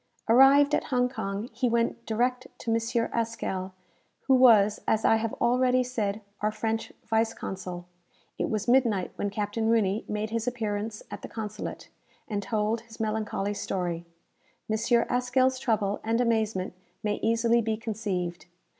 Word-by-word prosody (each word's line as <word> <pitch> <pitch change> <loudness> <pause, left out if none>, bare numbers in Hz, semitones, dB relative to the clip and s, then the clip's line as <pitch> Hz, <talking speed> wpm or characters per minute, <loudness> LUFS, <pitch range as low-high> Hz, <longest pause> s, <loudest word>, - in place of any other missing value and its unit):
Arrived 275 +5 +6
at - - +1
Hong 250 -2 +2
Kong, 200 -3 -4
he 245 +2 0
went 235 0 0
direct 250 +3 0
to 230 - -3
M. 230 +1 0
Haskell, 220 -5 -2 0.5
who 265 - +2
was, 225 -5 +6
as 220 0 +2
I 225 - +5
have 225 0 -2
already 250 +1 +3
said, 220 -4 -2 0.2
our 210 +1 0
French 225 +1 -2
vice 225 0 +1
consul. 180 -2 -6 0.5
It - - 0
was 215 0 -2
midnight 235 -7 +3
when 205 - -1
Captain 210 +2 -1
Rooney 215 -2 +2
made 215 +1 -3
his 230 +1 -2
appearance 215 -3 -3
at - - -6
the - - -7
consulate, 215 -1 -6 0.4
and 205 -2 -2
told 215 +2 -1
his 230 -1 -15
melancholy 215 -2 -1
story. 175 -4 -3 0.6
M. 225 +2 +2
Haskell's 255 +1 +2
trouble 210 -5 0
and 225 +1 +1
amazement 220 -6 0 0.3
may 210 -1 -1
easily 230 +1 +3
be 220 -1 -1
conceived. 200 -6 -3
225 Hz, 150 wpm, -27 LUFS, 205-235 Hz, 0.6 s, Arrived